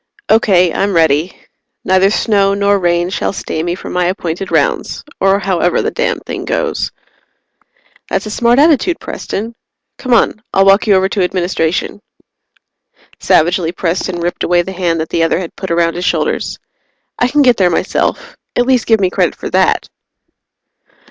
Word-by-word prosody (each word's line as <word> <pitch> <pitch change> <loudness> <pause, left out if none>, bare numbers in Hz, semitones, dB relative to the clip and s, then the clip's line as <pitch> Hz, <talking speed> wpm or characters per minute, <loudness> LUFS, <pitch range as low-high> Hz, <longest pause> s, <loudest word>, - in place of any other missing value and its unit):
"Okay. 185 -6 +3
I'm 200 -1 -1
ready. 160 +1 +2 0.5
Neither 190 +1 +3
snow 200 -2 +1
nor 200 0 +2
rain 175 0 0
shall - - -1
stay 160 - -4
me 175 +1 -2
from - - -8
my 180 0 +1
appointed 180 0 -3
rounds, - - 0 0.2
or 195 0 +3
however 185 -3 0
the - - -1
damned - - -2
thing - - -5
goes." - - -2 1.2
"That's - - -1
a 215 - -6
smart 235 +3 +2
attitude, 320 +4 +3
Preston. 225 +4 -5 0.5
Come 255 - -5
on 215 - +1
I'll 195 0 +4
walk 195 +3 +4
you 205 - +5
over 190 0 +2
to 200 - -1
Administration." 180 0 -1 1.2
Savagely, 170 +1 +2
Preston 175 0 -2
ripped 175 +1 -3
away 175 0 +2
the 190 - -7
hand 175 -3 -1
that 160 - -3
the 165 - -1
other 165 - +2
had 175 -2 -6
put 190 - -6
around 170 0 +1
his 175 - -5
shoulders. - - -1 0.6
"I 245 - +3
can 290 +3 +2
get 250 -3 +4
there 185 -2 +3
myself. 475 - -2 0.2
At 245 - +2
least 255 -3 +1
give 225 -1 +4
me 185 -2 +1
credit - - 0
for - - -7
that!" - - +1
190 Hz, 170 wpm, -14 LUFS, 175-210 Hz, 1.2 s, you